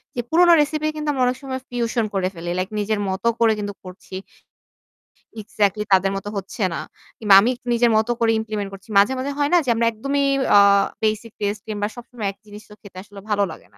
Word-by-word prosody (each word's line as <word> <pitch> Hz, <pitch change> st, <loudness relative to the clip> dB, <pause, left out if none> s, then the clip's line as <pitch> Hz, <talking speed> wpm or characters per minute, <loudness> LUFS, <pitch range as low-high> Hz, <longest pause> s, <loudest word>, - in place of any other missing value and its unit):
যে 240 Hz, -, -1 dB
পুরোনো 345 Hz, +2 st, +5 dB
রেসিপি 305 Hz, +1 st, -1 dB
কিন্তু 300 Hz, -1 st, -3 dB
আমরা 265 Hz, -3 st, 0 dB
অনেক 250 Hz, 0 st, 0 dB
সময় 260 Hz, -1 st, -5 dB
ফিউশন 235 Hz, -1 st, -1 dB
করে 190 Hz, -1 st, 0 dB
ফেলি। 170 Hz, -1 st, -7 dB
লাইক 185 Hz, +1 st, -2 dB
নিজের 210 Hz, 0 st, -1 dB
মত 190 Hz, +1 st, -4 dB, 0.2 s
করে 230 Hz, -1 st, +4 dB
কিন্তু 205 Hz, 0 st, -4 dB
করছি। 185 Hz, 0 st, -11 dB, 1.3 s
এক্সাক্টলি 210 Hz, 0 st, 0 dB
তাদের 190 Hz, +1 st, +3 dB
মতো 195 Hz, +1 st, -5 dB
হচ্ছে 200 Hz, +3 st, -7 dB
না। -, -, -3 dB, 0.4 s
কিংবা 210 Hz, -3 st, +3 dB
আমি 220 Hz, +5 st, +2 dB
একটূ 245 Hz, 0 st, -15 dB
নিজের 235 Hz, 0 st, +3 dB
মত 220 Hz, -, +1 dB
করে 230 Hz, -1 st, +3 dB
ইমপ্লিমেন্ট 215 Hz, -2 st, -4 dB
করছি। 195 Hz, +3 st, -13 dB
মাঝে, 205 Hz, +6 st, +5 dB
মাঝে, 265 Hz, +2 st, -3 dB
হয় 285 Hz, 0 st, +1 dB
না -, -, +7 dB
যে -, -, -2 dB
আমরা 230 Hz, +1 st, +1 dB
একদমই 275 Hz, +5 st, -1 dB, 0.3 s
আ -, -, +9 dB, 0.4 s
বেসিক 215 Hz, +1 st, -1 dB
টেস্ট 205 Hz, 0 st, -2 dB
কিংবা 205 Hz, -1 st, -2 dB
সবসময় 240 Hz, -3 st, -6 dB
এক 195 Hz, -, -21 dB
জিনিস 210 Hz, 0 st, -12 dB
তো -, -, -13 dB
খেতে 200 Hz, -3 st, -14 dB
আসলে 205 Hz, 0 st, -13 dB
ভালো 205 Hz, -1 st, +2 dB
লাগে -, -, -13 dB
না। -, -, -23 dB
215 Hz, 215 wpm, -21 LUFS, 200-245 Hz, 1.3 s, আ